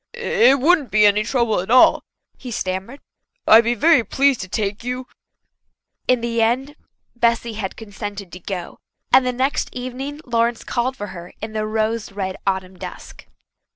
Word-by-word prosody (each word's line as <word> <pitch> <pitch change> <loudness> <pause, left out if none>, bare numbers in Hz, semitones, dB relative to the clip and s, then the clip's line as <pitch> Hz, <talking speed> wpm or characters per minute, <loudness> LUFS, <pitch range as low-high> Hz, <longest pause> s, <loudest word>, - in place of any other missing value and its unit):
"It 275 - +3
wouldn't 305 -1 +3
be 210 0 +4
any 205 +1 +4
trouble 235 -2 +1
at 185 - -5
all," 255 +2 +6 0.3
he 255 - -9
stammered. 195 +4 -4 0.5
"I'll 220 +1 +9
be 235 +1 0
very 310 -2 +4
pleased 275 +4 +2
to 190 - -6
take 205 +1 -2
you." 250 +1 -4 1.0
In 250 -2 +3
the 235 -1 -1
end 260 +6 0 0.4
Bessy 235 -1 +1
had 210 -3 -5
consented 205 -3 -7
to 180 - -9
go, 180 -1 -6 0.3
and 255 - +6
the - - +2
next 260 +3 -1
evening 255 +4 -6
Lawrence 235 -1 0
called 255 +2 -2
for 205 - -5
her 175 -1 -10
in 220 0 -6
the 215 0 -2
rose 220 0 -1
red 190 -2 -4
autumn 190 -1 -2
dusk. - - -10
230 Hz, 165 wpm, -21 LUFS, 205-255 Hz, 1.0 s, I'll